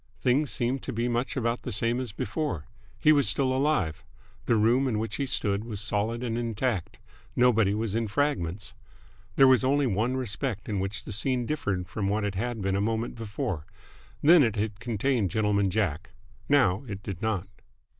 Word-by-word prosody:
Things 130 +6 +2
seemed 125 +1 -1
to - - -5
be 115 +2 -1
much 120 +3 -1
about 115 -1 0
the - - -5
same 115 +4 +1
as 125 -4 -3
before. 100 - -3 0.3
He 155 +6 +5
was 140 -8 +4
still 130 +5 +1
alive. 130 - 0 0.4
The 115 - +4
room 120 +5 +3
in 115 -4 0
which 110 0 -3
he 140 - -1
stood 100 -4 0
was 110 -4 -5
solid 110 +3 -1
and 115 -1 -2
intact. 115 -4 -2 0.4
Nobody 115 -5 +4
was 110 -2 -2
in 115 0 0
fragments. 105 - -1 0.6
There 135 - +7
was 130 0 +5
only 140 +2 +2
one 120 +3 0
respect 115 -2 -2
in 105 -3 -1
which 95 +1 -3
the - - -8
scene 125 +4 +1
differed 100 - -2
from 100 -3 -3
what 105 +2 0
it 100 -1 -1
had 115 +2 -3
been 95 0 0
a 100 - +1
moment 115 +2 -1
before. 110 - -4 0.6
Then, 165 +2 +8
it 115 -5 +2
had 105 -1 -2
contained 120 -2 0
Gentleman 105 -2 +1
Jack. 90 -6 -1 0.4
Now 125 -9 +3
it 100 -2 -6
did 95 -5 -6
not. 105 -4 -1
115 Hz, 185 wpm, -27 LUFS, 100-125 Hz, 0.6 s, Then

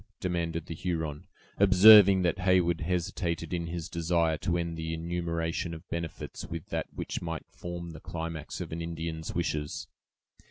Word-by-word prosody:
demanded 85 -3 -2
the - - -5
Huron, 80 -3 -3 0.3
observing 100 0 +8
that 90 +2 +1
Heyward 90 -3 +3
hesitated 85 -1 -2
in 85 -1 -2
his 85 -1 -4
desire 85 -1 +1
to 85 -2 0
end 85 -1 -2
the 80 0 -3
enumeration 85 0 -2
of 80 +3 -12
benefits 85 -1 -5
with 85 -2 -7
that - - -2
which - - -4
might 85 -1 -4
form 85 -1 -6
the 80 - -9
climax 80 -2 -5
of - - -6
an 80 +1 -4
Indian's 80 -1 -4
wishes. 75 -4 -2
85 Hz, 155 wpm, -29 LUFS, 80-85 Hz, 0.3 s, observing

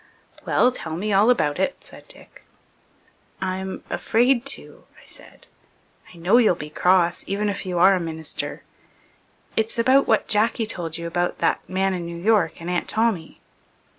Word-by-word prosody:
"Well, 250 - +3
tell 160 -10 -6
me 205 +3 -2
all 205 +4 +4
about 150 -11 +1
it," 190 +8 0
said - - -12
Dick. - - -14 1.0
"I'm 190 0 -4
afraid 245 +3 +1
to," - - -5
I - - -19
said. - - -16 0.7
"I 175 - -15
know 175 +7 +3
you'll 220 -7 +4
be 150 -1 -8
cross 180 0 +2
even 205 +2 -1
if 200 -1 -4
you 180 -1 -2
are 190 +3 +6
a 185 - +1
minister. 160 -2 -5 0.9
It's 220 +1 -1
about 260 +4 +4
what 220 - +2
Jack 215 +2 +2
told 175 -7 -3
you 170 - -6
about 175 +1 -1
that - - 0
man 190 +1 0
in 175 -2 -4
New 170 0 -7
York 180 -4 +1
and 170 - -8
Aunt 180 -1 -2
Tommy." 220 -8 -1
190 Hz, 165 wpm, -23 LUFS, 170-220 Hz, 1.0 s, are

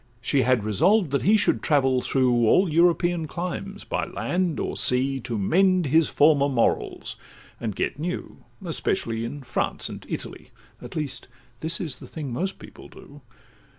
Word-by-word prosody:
She 130 +3 +1
had 125 -4 +2
resolved 155 - +2
that 140 - +1
he 215 +3 +4
should 205 - +1
travel 135 -4 +2
through 125 -4 +2
All 185 - +4
European 170 0 +2
climes, 185 +5 -5
by - - -2
land 175 -3 -1
or - - -3
sea, 135 +2 +2
To 120 -2 -4
mend 185 - +3
his 155 +3 +3
former 145 -1 +4
morals, 125 -4 -1 0.4
and 110 -4 -4
get 140 - -2
new, 175 +3 -4 0.3
Especially 120 -8 -2
in 135 +4 -6
France 120 - -2
and - - -8
Italy - - -6 0.3
(At - - -10
least 150 -4 -4 0.3
this 165 +1 0
is 160 -7 -3
the - - -12
thing 145 -6 -6
most 190 +9 -2
people - - -13
do). 145 +1 -15
145 Hz, 160 wpm, -25 LUFS, 125-175 Hz, 0.4 s, he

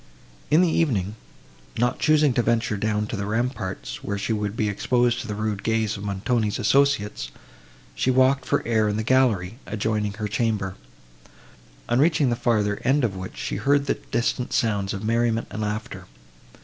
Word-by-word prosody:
In 155 +3 +5
the 180 - +4
evening, 115 - +1 0.6
not 120 +2 +1
choosing 150 -3 +4
to 120 - +2
venture 115 -2 +1
down 105 +1 0
to 105 - -5
the 100 -1 -3
ramparts, 105 - -3
where 100 - -2
she 105 +3 -1
would 105 0 -2
be 110 - +1
exposed 120 +4 +1
to - - -8
the 105 - -3
rude 105 -1 -2
gaze 110 -1 0
of 100 - -7
Montoni's 105 +2 -1
associates, 125 - +1 0.6
she - - 0
walked 130 +1 +4
for - - 0
air 110 -2 +2
in 105 - -1
the 110 - -1
gallery, 115 -4 +2
adjoining 105 -1 -1
her 105 +1 -4
chamber; 105 -3 -1 1.1
on 120 +1 +2
reaching 150 -3 +3
the - - +1
further 110 -4 0
end 135 +2 +2
of 105 -5 0
which 95 0 -7
she - - -3
heard 140 0 +2
distant 120 +1 -1
sounds 100 -3 0
of 100 - -6
merriment 115 +1 +1
and 110 - -4
laughter. 105 -3 -4
110 Hz, 175 wpm, -24 LUFS, 105-125 Hz, 1.1 s, In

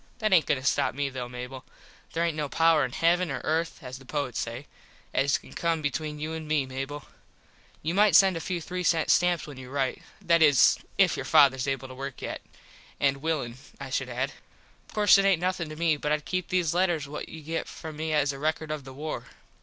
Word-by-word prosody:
That 215 -4 +1
aint 170 -4 +5
goin - - +2
to 130 - -8
stop 140 -2 +1
me 140 0 -1
though, 125 -2 -5
Mable. 125 +2 -7 0.5
There 165 +1 +1
aint 170 -2 -1
no 150 -2 -2
power 165 -1 +4
in 125 - -2
heavin 175 +4 +2
or 135 - -3
earth, 165 +1 -1
as 130 +1 -7
the - - -14
poets 140 -3 -3
say, 120 +4 -4 0.5
as 140 0 +2
can - - -15
come 165 -2 -1
between 150 +1 -2
you 155 +2 -4
and 160 -1 -6
me, 150 -3 +1
Mable. 135 +2 -6 0.8
You 160 +3 -1
mite 200 -2 +4
send 190 0 +7
a - - -2
few 175 +3 -2
three 180 +3 -4
sent 165 -2 +2
stamps 175 -1 +3
when 145 -3 -10
you 130 -1 -9
rite. 135 -1 -1 0.2
That 170 -4 +3
is 145 -4 +6 0.2
if - - +4
your - - -4
fathers 130 -1 +5
able 135 -1 -2
to 130 - -10
work 135 +1 -6
yet. - - -4 0.6
And 140 -1 +2
willin, 135 -5 -2 0.2
I 135 -1 -7
should 130 -1 -1
add. 130 +3 -2 0.6
Of - - -15
course 210 -1 +6
it 195 - +2
aint 195 -4 +4
nothin 180 -2 -1
to 155 - -7
me 160 -1 +2
but 150 +1 -2
Id 150 -1 0
keep 185 -1 -2
these 180 -4 +1
letters 175 -5 +1
what 150 +1 -6
you 160 -1 -9
get 165 +2 -3
from 160 -1 -8
me 160 0 -2
as 145 -2 +2
a 135 - -8
record 155 +1 -1
of 150 -3 -4
the 135 - -9
war. 150 +3 -5
150 Hz, 230 wpm, -27 LUFS, 135-165 Hz, 0.8 s, send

